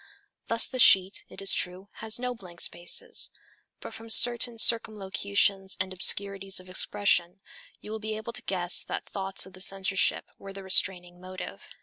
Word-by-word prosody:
Thus 230 0 +2
the 255 - -5
sheet, 190 -4 +5
it - - -10
is 195 - +5
true, 180 +2 -3
has 220 0 -3
no 250 0 -3
blank 180 -7 -14
spaces, 175 0 -1 0.5
but - - -9
from 225 +1 -11
certain 240 +1 +4
circumlocutions 200 -3 +2
and 185 0 -3
obscurities 195 +1 0
of 185 0 -13
expression 185 -1 0 0.4
you 210 - -10
will 220 - -4
be 215 0 -4
able 220 +2 -7
to 245 - -1
guess 180 -5 -1
that - - -5
thoughts 195 -1 -4
of 190 - -14
the 185 - -9
censorship 195 0 0
were 195 0 -10
the 195 0 -9
restraining 180 -2 +1
motive. 185 0 -9
195 Hz, 165 wpm, -27 LUFS, 185-220 Hz, 0.5 s, sheet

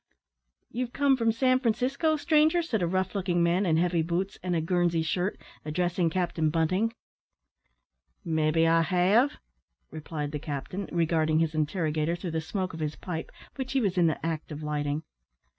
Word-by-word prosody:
"You've 245 0 -3
come 280 -1 +3
from 230 -3 +2
San 255 +3 +2
Francisco, 255 +7 +1
stranger?" 310 +2 +3
said 230 - -1
a 175 - +1
rough 185 +1 -1
looking 180 -4 +1
man, 175 +3 +2
in 160 -1 +3
heavy 175 0 +2
boots, 175 +4 -2
and 180 -1 -1
a - - +2
Guernsey 170 0 +1
shirt, 180 +4 -1 0.2
addressing 175 +2 0
Captain 170 -2 0
Bunting. 185 +8 +1 1.3
"Maybe 160 0 +2
I 165 0 +4
have," 195 - +3 0.5
replied 150 -2 -5
the 150 - -3
captain, 150 +7 -5
regarding 160 -2 +2
his 160 -1 +1
interrogator 155 0 0
through 175 0 -5
the 160 0 -1
smoke 185 +3 -3
of 165 - -7
his 150 -1 -2
pipe, 165 -3 -5 0.3
which 265 -1 -4
he 270 - +3
was 200 -7 0
in 175 -2 +4
the 160 - -2
act 160 -1 -3
of 150 +1 -6
lighting. 150 0 -2
175 Hz, 170 wpm, -28 LUFS, 160-200 Hz, 1.3 s, I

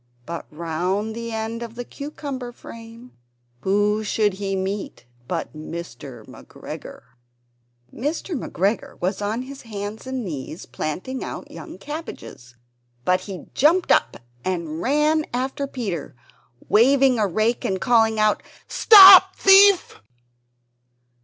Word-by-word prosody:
But 170 +4 -7
round 175 +7 -3
the 230 0 -6
end 225 +1 -4
of 235 0 -8
a 245 - -4
cucumber 280 -2 -7
frame, 230 +1 -13 0.5
whom 205 - +1
should 210 -1 0
he 195 -1 -2
meet 190 -3 -4 0.2
but - - -4
Mr. 155 - -9
McGregor! - - -11 0.9
Mr. 315 +7 -3
McGregor 205 - -2
was 190 +3 -2
on 215 +4 -2
his 275 +1 -10
hands 210 +1 -7
and 260 -3 -4
knees 155 -1 -7
planting 165 - -5
out - - -8
young - - -10
cabbages, 295 - -9 0.5
but 185 0 +3
he 190 -1 -8
jumped 335 +6 +3
up - - +2 0.3
and 170 -3 -3
ran 300 - +2
after 265 +2 -2
Peter, 195 - -5 0.5
waving 260 +2 +4
a 210 - +2
rake 220 +6 0
and 190 -1 -1
calling 225 -2 +2
out, 215 0 +2 0.3
"Stop, 385 -3 +9
thief!" 390 - +5
220 Hz, 120 wpm, -22 LUFS, 190-265 Hz, 0.9 s, Stop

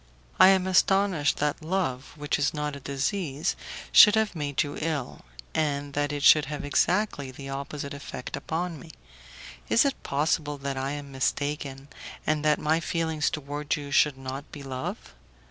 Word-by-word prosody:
I - - +9
am 190 -1 +4
astonished 190 -4 +3
that 150 +2 -1
love, 160 -7 -2
which 145 0 -1
is 145 +2 +1
not 150 -1 -2
a - - -8
disease, 140 +2 -2 0.4
should 210 -1 +9
have 220 -4 +1
made 145 -3 0
you 145 - -6
ill, 150 -5 -3 0.3
and 145 -2 -1
that 145 0 0
it 145 -1 -3
should 155 -1 +7
have 145 0 -5
exactly 165 -1 +1
the 135 +2 -9
opposite 140 +1 -5
effect 140 -2 -7
upon 165 -1 -3
me. 165 - -12 0.8
Is 230 - +5
it 275 - -1
possible 145 +1 0
that 140 0 -4
I 135 +1 -2
am 145 -1 -7
mistaken, 140 0 -2 0.4
and 155 -1 0
that 150 0 +3
my 155 +2 +1
feeling 165 -1 -2
towards 145 +1 -1
you 145 -1 -7
should 145 -1 +3
not 135 +2 -7
be 145 - -9
love? 130 - -6
145 Hz, 165 wpm, -27 LUFS, 140-160 Hz, 0.8 s, I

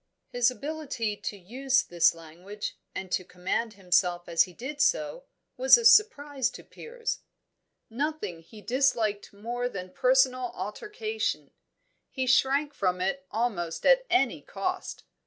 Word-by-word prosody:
His 245 0 +3
ability 275 -5 -4
to 205 - -6
use 260 +7 0
this 170 -1 +3
language, 175 +6 -8 0.2
and 190 -1 -6
to 185 - 0
command 185 +6 -3
himself 180 -2 +1
as 170 -1 +4
he 180 - -14
did 280 - -5
so, 305 - +1 0.3
was - - +7
a 470 - -3
surprise 290 - +4
to - - -13
Piers. 465 0 -5 0.7
Nothing 265 - -3
he 210 +6 -14
disliked 225 -3 0
more 240 +4 -3
than 185 -4 -7
personal 255 -1 +2
altercation; 425 - -4 0.6
he 260 -1 -2
shrank 275 +3 +3
from 185 -7 0
it 190 +9 0
at 275 - -29
almost 205 -8 -2 0.2
any 370 - +2
cost. - - -4
245 Hz, 135 wpm, -28 LUFS, 185-285 Hz, 0.7 s, was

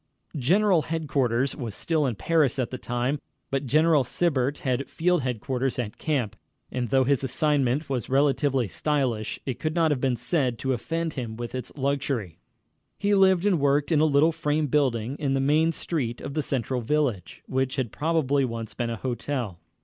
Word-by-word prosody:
General 180 +6 +3
Headquarters 140 -6 0
was 115 -8 -5
still 155 -4 0
in 120 - -2
Paris 150 - +2
at 125 -3 -1
this 130 - -5
time, 125 +5 -1 0.3
but 135 0 -1
General 155 +1 +4
Sibert 140 -1 0
had 130 +1 0
Field 175 0 +1
Headquarters 125 +1 -2
at 120 -3 -4
camp, 135 -9 -1 0.4
and 125 -2 -2
though 135 +2 +4
his 135 0 +1
assignment 140 +1 +1
was 130 -5 -3
relatively 135 -2 +2
stylish, 125 - -1
it 130 -4 -3
could 155 +1 -2
not 165 -2 +3
have 135 -4 0
been 130 -2 +2
said 125 0 0
to 130 +3 -1
offend 165 +7 -2
him 120 -5 -5
with 120 -1 -5
its 125 -1 -5
luxury. 135 - -2 0.6
He 205 0 +1
lived 190 -2 +4
and 190 -5 +3
worked 145 +2 +2
in 155 - +4
a 155 - +5
little 150 +2 +4
frame 155 -1 0
building 130 -3 0
in 140 -3 0
the - - +1
main 155 +4 +3
street 130 -9 -3
of 140 - -6
the 155 - 0
central 130 -2 -2
village, 120 - -1
which 130 0 -1
had 125 -5 -2
probably 150 -3 +1
once 115 -3 -4
been 120 -1 -2
a 115 - -2
hotel. 120 -6 -3
135 Hz, 180 wpm, -26 LUFS, 125-150 Hz, 0.6 s, a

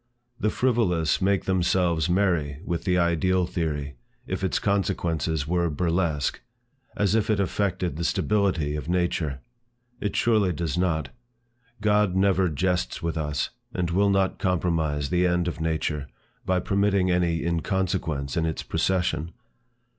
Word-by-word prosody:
The 105 - +1
frivolous 100 - +1
make 95 +1 +2
themselves 90 -3 +1
merry 85 -7 +1
with 85 -2 -3
the 90 -1 +2
Ideal 90 +1 +2
theory, 75 -6 -3 0.3
if - - -4
its - - +1
consequences 80 -6 0
were 85 0 +1
burlesque; 85 -2 0 0.6
as 105 -1 +2
if 110 -1 +1
it 105 -2 +2
affected 95 -5 -1
the 85 - -2
stability 95 -6 +1
of 75 +1 -5
nature. 85 -6 0 0.6
It 105 - -2
surely 105 -6 +3
does 85 -2 -2
not. 85 -5 0 0.7
God 105 -3 +2
never 95 -1 +3
jests 85 -4 -1
with 85 -1 -1
us, 75 -2 -2 0.2
and 90 -2 -1
will 100 +3 +3
not 95 -1 +1
compromise 80 -6 0
the 90 0 +3
end 90 0 +1
of 80 - -4
nature, 80 -3 -1 0.4
by 95 -1 +2
permitting 100 -1 +2
any 85 -2 +1
inconsequence 85 -5 -1
in 80 -1 +1
its 80 - -3
procession. 90 -3 0
90 Hz, 140 wpm, -25 LUFS, 80-95 Hz, 0.7 s, surely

